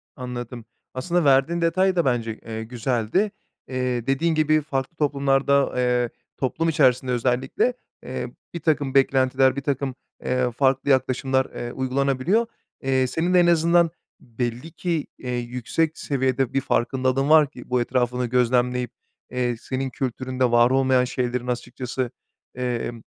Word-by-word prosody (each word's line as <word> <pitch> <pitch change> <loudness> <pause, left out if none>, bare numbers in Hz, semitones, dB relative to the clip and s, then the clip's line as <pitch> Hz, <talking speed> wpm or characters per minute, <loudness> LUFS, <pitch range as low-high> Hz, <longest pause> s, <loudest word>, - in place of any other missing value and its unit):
Anladım. 120 -2 -6 0.3
Aslında 170 +6 0
verdiğin 140 +5 +3
detay 185 +3 +2
da 170 - +2
bence, 115 -4 -1
eee, 110 0 -5
güzeldi. 120 - -1 0.4
Eee, 125 -2 -2
dediğin 160 +5 +1
gibi 155 0 +3
farklı 140 +1 -3
toplumlarda, 140 -1 +2
eee, 125 -1 +1 0.3
toplum 160 +5 0
içerisinde 130 -4 +3
özellikle, 125 - +1 0.3
eee, 125 -1 -4 0.3
birtakım 155 -5 0
beklentiler, 130 -1 +3
birtakım, 140 -1 -2 0.3
eee, 125 -1 0
farklı 135 +3 +1
yaklaşımlar, 130 0 +2
eee, 120 - -6
uygulanabiliyor. 135 - +1 0.4
Eee, 130 -1 +2
senin 165 +8 -1
de 180 - +6
en 175 - +4
azından 170 0 +4 0.3
belli 120 +5 -5
ki, 165 -2 -2
eee, 125 - -7
yüksek 125 +6 -2
seviyede 130 -2 0
bir 135 - +1
farkındalığın 130 +3 0
var 155 -2 +6
ki 125 - -13
bu 125 -1 +2
etrafını 125 0 0
gözlemleyip, 125 0 +1 0.4
eee, 125 -1 0
senin 130 +3 -3
kültüründe 130 0 -2
var 120 0 +5
olmayan 130 -1 +3
şeylerin 125 -1 -2
açıkçası, 125 0 -3 0.4
emm, 120 -2 -3
130 Hz, 130 wpm, -23 LUFS, 125-140 Hz, 0.4 s, de